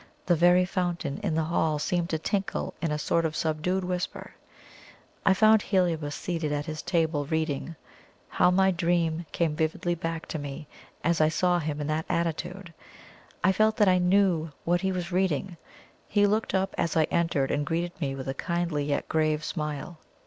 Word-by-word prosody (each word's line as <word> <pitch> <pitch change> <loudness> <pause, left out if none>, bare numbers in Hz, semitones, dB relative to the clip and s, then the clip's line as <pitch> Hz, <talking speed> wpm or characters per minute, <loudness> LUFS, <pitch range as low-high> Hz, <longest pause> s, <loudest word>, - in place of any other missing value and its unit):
The 175 - +3
very 175 +2 +5
fountain 175 -5 -2
in 185 -7 -1
the 160 - +1
hall 160 -1 +1
seemed 175 +3 -1
to 160 - 0
tinkle 195 +5 -2
in 165 - 0
a 150 - 0
sort 165 +2 +1
of 155 -1 -1
subdued 160 +5 -1
whisper. 180 0 -4 0.9
I 190 - +6
found 215 +1 +5
Heliobas 165 -8 0
seated 165 -4 -3
at 145 0 -2
his 155 -1 -5
table, 160 -5 0
reading. 160 0 -2 0.5
How 180 - +3
my 190 +1 +4
dream 170 -2 0
came 165 -3 0
vividly 160 +2 0
back 165 -1 -4
to 155 - -3
me, 145 +1 -7 0.4
as 170 -1 +2
I 155 - +5
saw 175 +2 +2
him 150 -2 -3
in 150 - -2
that 155 +1 -2
attitude! 170 +2 -2 0.7
I 190 - +5
felt 215 +3 +2
that 210 - +4
I 185 -1 +5
knew 180 -3 +2
what 175 +1 +2
he 190 -1 0
was 180 -1 -3
reading. 180 -1 0 0.5
He 205 -1 +3
looked 210 0 0
up 190 +1 0
as 165 -1 0
I 160 - +5
entered, 165 -5 +1
and 145 - 0
greeted 170 +4 -1
me 135 -2 -1
with 135 -1 -6
a 135 - -1
kindly 170 -1 -1
yet 145 -1 -1
grave 155 -1 +1
smile. 150 0 -4
170 Hz, 185 wpm, -27 LUFS, 155-180 Hz, 0.9 s, I